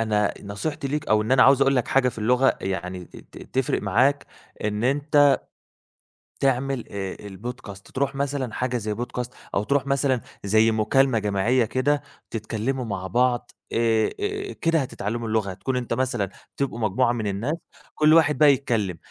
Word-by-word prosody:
أنا 105 -2 +2
أ - - -2
نصيحتي 105 +8 -4
ليك 150 +2 -3
أو 110 0 +4
إن 110 - -1
أنا 130 - +6
عاوز 135 0 +6
اقول 135 0 +4
لك 125 - 0
حاجة 135 -1 +3
في 120 - -6
اللغة 125 +4 +3
يعني 90 -1 -4
ت - - -16 0.2
ت - - -14
تفرِق 130 - 0
معاك 130 +8 +2 0.4
إن 105 +2 -1
أنت 145 +1 +4 1.0
تعمل 135 -1 0
آآ 95 -2 -4
البودكاست 100 0 -8
ترُوح 140 +1 -1
مثلًا 135 -4 -2
حاجة 125 -1 -1
زي 105 -2 -3
بودكاست 125 +2 -5 0.2
أو 100 - +1
ترُوح 140 +3 0
مثلًا 135 -3 +1 0.2
زي 110 +3 +4
مكالمة 115 +3 +2
جماعيّة 105 +4 +1
كده 140 +6 +1 0.3
تتكلموا 115 +4 -3
مع 95 -3 -4
بعض 120 +5 +1 0.2
آآ 115 -1 +2
آآ 410 -1 -3
كده 165 -1 +1
هتتعلموا 115 -3 -3
اللغة، 110 -3 0
هتكون 125 +7 -3
أنت 120 -2 -2
مثلًا 115 -6 -1 0.3
تبقوا 140 -4 -2
مجموعة 115 +3 +2
من 115 -3 -2
الناس 105 +10 -1 0.4
كل 155 0 +5
واحد 160 -2 +4
بقى 150 -2 +7
يتكلّم، 110 -10 -1
125 Hz, 170 wpm, -24 LUFS, 105-135 Hz, 1.0 s, بقى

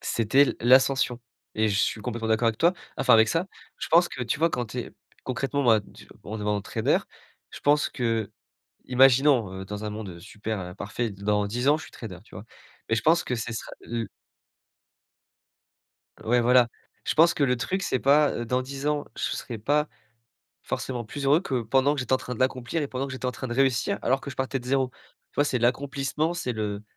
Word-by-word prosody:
c'était 115 +5 +3
l - - -3
l'ascension 130 0 +4 0.3
et 110 0 +2
je 100 - 0
suis 110 - 0
complètement 115 0 -4
d'accord 110 +1 +2
avec 110 - -2
toi, 170 +2 +4 0.2
enfin - - +3
avec 110 0 +6
ça. 165 +7 0 0.3
Je - - -5
pense 170 +2 +5
que 125 - -5
tu 120 +4 -2
vois 165 +1 +3
quand 120 -5 -2
tu 125 +4 -7
es 120 - -5 0.3
concrètement 135 +2 -1
moi, 115 -4 +5 0.4
en 105 - -8
devenant 105 0 -1
trader, - - +1 0.5
je - - -10
pense 145 +1 +3
qu'imaginons, 125 +2 +1
heu, - - -7
dans 105 +2 -6
un 105 - -3
monde, 105 -2 -6
heu, 85 -1 -11
super, 105 +3 -5
heu, 90 -1 -7
parfait, 110 +4 -3
dans 105 +1 0
10 120 +6 -1
ans, 150 - +5
je - - -9
suis - - -12
trader, 95 -6 -8
tu - - -17
vois? 105 - -9 0.4
Mais 115 - +2
je - - -1
pense 165 +2 +3
que 125 - -2
ce 120 0 -4
sera 115 - -6
l 115 -3 -4 2.1
Ouais, 120 +2 +3
voilà. 125 0 +5 0.3
Je - - -1
pense 165 +2 +5
que 145 - 0
le 125 -2 +2
truc, 185 +10 -2
c'est 130 - 0
pas, 145 +3 +4
heu, 120 - -4
dans 125 +2 0
10 140 +2 -5
ans. 150 -1 0
Je - - -4
s - - -2
serais 120 -3 -6
pas 150 +7 +1 0.8
forcément 120 -3 -4
plus 140 +6 -6
heureux 145 +4 +4
que 130 -10 -2
pendant 135 +5 +2
que 140 - -3
j'étais 130 - -3
en - - +6
train 125 -1 -6
de 115 - -10
l'accomplir 130 +4 0
et 145 - -3
pendant 130 +1 -3
que 140 - -7
j'étais 130 0 -4
en 125 - -1
train 130 - -6
de 120 - -3
réussir 130 -3 +1
alors 135 +2 +2
que 140 - -7
je 135 - -10
partais 130 0 -1
de 125 - -11
0. 130 0 +1 0.4
Tu - - -35
vois, 145 - +4
c'est 130 -3 0
l'accomplissement, 140 +6 0
c'est 150 -8 -2
le 105 -2 -3
125 Hz, 220 wpm, -26 LUFS, 110-140 Hz, 2.1 s, avec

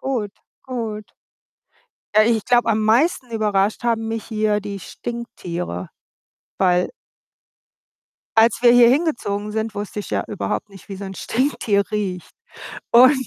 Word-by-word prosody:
Gut, 240 -7 -2 0.3
gut. 225 -5 -5 1.1
Äh, 215 +2 +5
ich 220 -3 0
glaube, 240 -1 +3
am 220 0 +1
meisten 250 +3 +2
überrascht 210 -2 0
haben 225 -1 0
mich 225 -1 -3
hier 215 -2 0
die 200 -1 -6
Stinktiere, 175 - -6 0.7
weil 180 -1 +2 1.5
Als 225 +1 +5
wir 240 - +7
hier 240 -1 +7
hingezogen 235 -9 0
sind, 220 0 -3
wusste 205 +1 -4
ich - - -9
ja - - 0
überhaupt 210 +1 -3
nicht, 195 0 -15
wie 195 - -5
so 200 - -7
'n 190 - -7
Stinktier 220 -5 0
riecht 195 -4 -3 0.6
und 260 +2 +6
215 Hz, 135 wpm, -21 LUFS, 200-235 Hz, 1.5 s, wir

